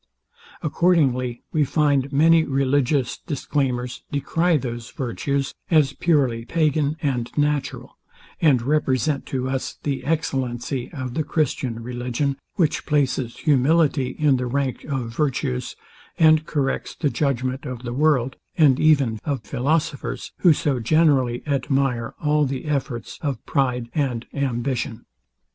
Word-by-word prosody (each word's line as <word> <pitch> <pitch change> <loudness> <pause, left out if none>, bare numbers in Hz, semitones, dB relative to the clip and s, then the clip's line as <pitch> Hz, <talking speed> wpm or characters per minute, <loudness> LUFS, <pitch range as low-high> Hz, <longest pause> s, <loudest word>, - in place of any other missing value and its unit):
Accordingly 140 -7 +1
we 155 - +2
find, 145 -1 +2
that 140 - -11
many 160 +3 +5
religious 135 -1 +1
declaimers 130 -4 -2
decry 165 +4 +1
those 120 -3 -5
virtues 135 +2 -2 0.2
as 155 -5 +4
purely 135 -9 +1
pagan 155 +1 +1
and 125 -5 -1
natural, 150 -1 -1 0.4
and 135 -7 +4
represent 140 0 0
to 130 -1 -2
us 130 0 -3
the 140 -2 -2
excellency 130 -5 -2
of 130 -6 -5
the 155 - 0
Christian 130 -6 -1
religion, 125 +3 -2 0.2
which 165 -7 0
places 130 -4 0
humility 145 -2 +2
in 145 -3 +3
the 125 0 -2
rank 135 0 -2
of 125 -5 -4
virtues, 120 - -1 0.4
and 155 -2 +5
corrects 140 -3 -2
the 145 -4 0
judgment 130 -2 -1
of 125 -1 -6
the 120 -1 -4
world, 135 -3 +2 0.2
and 140 -5 +5
even 140 -8 +3
of 140 -6 -2
philosophers, 150 +6 -2
who 175 - +6
so 145 -3 +1
generally 130 -2 +2
admire 135 -4 0
all 150 0 +2
the 130 +1 -4
efforts 135 -6 -3
of 140 -6 -3
pride 125 -3 0
and 130 -6 -1
ambition. 125 -4 -2
135 Hz, 130 wpm, -23 LUFS, 125-150 Hz, 0.4 s, who